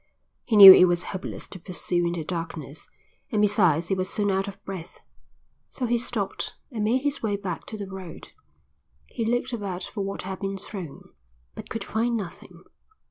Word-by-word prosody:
He 225 Hz, -, 0 dB
knew 195 Hz, -2 st, +13 dB
it 180 Hz, -, +7 dB
was 175 Hz, 0 st, 0 dB
hopeless 190 Hz, -1 st, -6 dB
to 185 Hz, -, -10 dB
pursue 175 Hz, 0 st, -1 dB
in 170 Hz, -, -2 dB
the 170 Hz, -2 st, -4 dB
darkness, 160 Hz, -3 st, -6 dB, 0.4 s
and 215 Hz, -, 0 dB
besides 180 Hz, -6 st, +3 dB
he -, -, +2 dB
was 185 Hz, -1 st, -2 dB
soon 205 Hz, -1 st, 0 dB
out 195 Hz, +1 st, 0 dB
of 200 Hz, -, -7 dB
breath, 185 Hz, -4 st, -8 dB, 0.7 s
so 255 Hz, -, -4 dB
he 240 Hz, 0 st, +1 dB
stopped 225 Hz, -4 st, -3 dB, 0.2 s
and 220 Hz, -4 st, -3 dB
made 245 Hz, +5 st, +1 dB
his 285 Hz, 0 st, -1 dB
way 210 Hz, -3 st, 0 dB
back 195 Hz, -4 st, -5 dB
to 215 Hz, -, -7 dB
the 205 Hz, -, -5 dB
road. 190 Hz, -3 st, -9 dB, 0.8 s
He 235 Hz, -, -5 dB
looked 245 Hz, +2 st, -1 dB
about 195 Hz, -5 st, -4 dB
for 205 Hz, -, -5 dB
what 195 Hz, 0 st, -5 dB
had 190 Hz, 0 st, -6 dB
been 195 Hz, 0 st, -3 dB
thrown, 185 Hz, -6 st, -9 dB, 0.4 s
but -, -, -10 dB
could 225 Hz, -, -4 dB
find 230 Hz, +2 st, -1 dB
nothing. 190 Hz, -2 st, -9 dB
195 Hz, 190 wpm, -25 LUFS, 180-215 Hz, 0.8 s, knew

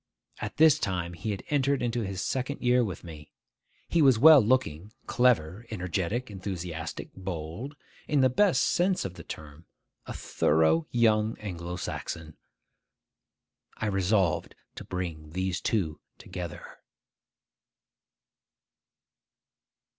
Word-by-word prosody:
At -, -, -5 dB
this 160 Hz, -2 st, +6 dB
time 90 Hz, -2 st, -2 dB
he 90 Hz, +5 st, -5 dB
had 100 Hz, -3 st, -3 dB
entered 140 Hz, -2 st, +2 dB
into 120 Hz, 0 st, 0 dB
his 95 Hz, -3 st, -3 dB
second 130 Hz, +2 st, -2 dB
year 125 Hz, 0 st, +4 dB
with 95 Hz, -5 st, -5 dB
me. 75 Hz, -3 st, -10 dB, 0.6 s
He 170 Hz, -, +2 dB
was 135 Hz, -5 st, +6 dB
well 150 Hz, +3 st, +9 dB
looking, 105 Hz, -5 st, 0 dB
clever, 115 Hz, -4 st, +2 dB
energetic, 100 Hz, +4 st, -2 dB
enthusiastic; 90 Hz, -4 st, -5 dB
bold; 95 Hz, -, -6 dB, 0.3 s
in 145 Hz, -3 st, +2 dB
the 130 Hz, -, +6 dB
best 135 Hz, 0 st, +3 dB
sense 180 Hz, -, +1 dB
of 95 Hz, -, -4 dB
the -, -, -11 dB
term, 75 Hz, +2 st, -10 dB, 0.4 s
a -, -, -5 dB
thorough 80 Hz, +1 st, +2 dB
young 110 Hz, -2 st, +2 dB
Anglo 90 Hz, -4 st, -5 dB
Saxon. 80 Hz, -3 st, -5 dB, 1.4 s
I -, -, -3 dB
resolved 95 Hz, -3 st, +1 dB, 0.2 s
to -, -, -8 dB
bring 80 Hz, -4 st, -5 dB
these 95 Hz, 0 st, -1 dB
two 90 Hz, -9 st, -1 dB, 0.2 s
together. 90 Hz, -3 st, -8 dB
95 Hz, 115 wpm, -28 LUFS, 85-125 Hz, 1.4 s, well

